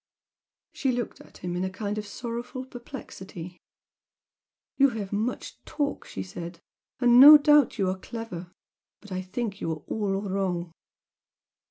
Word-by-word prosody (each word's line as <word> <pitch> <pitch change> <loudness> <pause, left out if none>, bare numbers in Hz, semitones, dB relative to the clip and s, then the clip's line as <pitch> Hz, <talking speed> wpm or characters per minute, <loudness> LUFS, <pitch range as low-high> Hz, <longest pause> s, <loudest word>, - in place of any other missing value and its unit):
She 270 - 0
looked 240 -2 -4
at - - -16
him 175 0 -4
in 180 - -1
a 190 - -1
kind 205 +2 -3
of 210 - -6
sorrowful 240 +4 -5
perplexity. 190 - -9 1.2
"You 275 0 +5
have 200 -2 -5
much 220 +5 -3
talk" 285 -1 -3
she 95 - -5
said 170 - -8 0.4
"and 245 -1 +6
no 295 +3 +12
doubt 295 -3 +4
you 195 -3 +1
are 185 0 -1
clever. 200 -6 -7 0.5
But 205 - -14
I 185 0 -2
think 200 +2 -4
you 165 - -1
are 155 -2 -5
all 200 -3 -1
wrong!" 185 -3 -2
205 Hz, 150 wpm, -27 LUFS, 185-245 Hz, 1.2 s, no